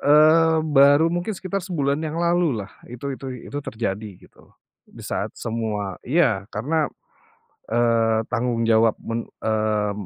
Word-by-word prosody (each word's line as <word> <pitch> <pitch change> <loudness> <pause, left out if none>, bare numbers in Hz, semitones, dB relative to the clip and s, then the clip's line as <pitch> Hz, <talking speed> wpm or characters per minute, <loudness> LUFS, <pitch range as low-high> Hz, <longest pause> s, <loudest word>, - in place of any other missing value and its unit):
Eee, 160 +2 +5
baru 145 +2 +5
mungkin 175 +5 -2
sekitar 195 +2 -3
sebulan 150 -6 -1
yang 160 0 -4
lalu 170 - +1
lah 100 - -16 0.2
itu 130 +3 -5
itu 135 - -9 0.3
itu 145 - -2
terjadi 110 -4 -4
gitu, - - -21 0.4
di - - -12
saat - - -2
semua 110 -4 -3
iya, 120 - +1
karena, 145 +9 -1 0.8
eee, 115 -1 +2
tanggung 120 -1 0
jawab 115 -1 +4
men 115 0 -4 0.2
eee, 110 -1 0
125 Hz, 135 wpm, -23 LUFS, 110-155 Hz, 0.8 s, Eee